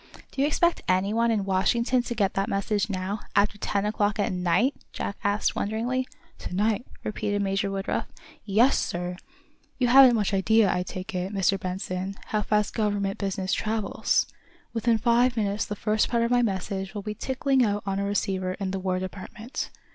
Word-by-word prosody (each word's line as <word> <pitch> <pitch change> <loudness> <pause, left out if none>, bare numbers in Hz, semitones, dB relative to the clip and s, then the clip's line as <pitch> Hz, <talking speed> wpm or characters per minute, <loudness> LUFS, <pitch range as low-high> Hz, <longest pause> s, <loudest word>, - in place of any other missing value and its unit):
"Do 270 - -2
you 285 - +4
expect 340 +3 +2
anyone 205 +6 +2
in 210 -4 +1
Washington 235 +6 +2
to 240 0 -5
get 200 -4 +1
that 195 +1 -1
message 205 +1 0
now, 195 +2 -2 0.2
after 205 +1 +2
ten 200 0 -1
o'clock 210 0 0
at 205 -3 0
night?" 180 +9 +2 0.2
Jack 200 - -4
asked, 205 +1 +1
wonderingly. 240 +5 -1 0.3
"To - - -6
night?" 210 +3 +1 0.2
repeated 205 -1 -1
Major 195 0 0
Woodruff. 195 0 -2 0.4
"Yes, 225 +7 +3
sir! 175 +1 -3 0.6
You 250 -2 +2
haven't 260 -1 +8
much 210 -2 0
idea, 210 +2 +4
I 180 - 0
take 185 +3 -6
it, 185 +1 -2
Mr. 195 -1 +1
Benson, 185 +1 -4
how 215 - +1
fast 210 0 +1
government 205 -3 -1
business 195 -1 -2
travels. 215 -2 0 0.5
Within 230 0 +2
five 240 +2 +3
minutes 205 -1 0
the 210 - -4
first 215 +1 +1
part 235 -1 +2
of 235 - 0
my 245 0 +4
message 195 -2 -2
will 205 - -4
be 210 +1 -3
ticking 265 +3 +1
out 205 -2 0
on 195 0 -1
a - - 0
receiver 190 -2 -1
in 190 -1 -3
the 195 - -2
War 185 -1 -1
Department. 200 +6 -6
205 Hz, 180 wpm, -26 LUFS, 195-225 Hz, 0.6 s, haven't